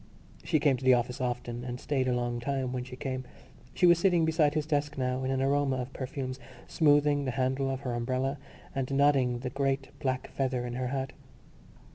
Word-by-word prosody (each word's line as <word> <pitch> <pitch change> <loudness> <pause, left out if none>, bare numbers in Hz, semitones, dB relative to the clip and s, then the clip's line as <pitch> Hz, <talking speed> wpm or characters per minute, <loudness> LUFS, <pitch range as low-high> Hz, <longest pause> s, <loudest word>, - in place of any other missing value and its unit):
She 155 - +2
came 140 -3 +3
to 130 - -10
the 130 -1 +6
office 125 +1 -2
often 120 -1 -3
and 125 0 -5
stayed 135 -3 0
a 125 - +2
long 120 -1 -1
time 130 0 -2
when 125 -1 -2
she 125 0 -9
came. 130 -1 -4 0.5
She 180 - +3
was 175 -1 +6
sitting 175 -3 +3
beside 160 -2 +2
his 155 -1 0
desk 145 -1 -1
now 130 0 -1
in 130 - -1
an 135 0 +1
aroma 140 0 +2
of 130 +1 -4
perfumes, 130 0 -4 0.3
smoothing 145 -2 +3
the - - -1
handle 130 +1 +1
of 135 0 -3
her 125 -3 -3
umbrella 130 +3 -1 0.3
and 135 -1 -2
nodding 135 -3 +3
the 125 -1 -4
great 135 -1 -1
black 130 -1 -2
feather 130 -2 -1
in 120 - -4
her 125 +1 -2
hat. 135 0 -3
130 Hz, 205 wpm, -29 LUFS, 125-140 Hz, 0.5 s, the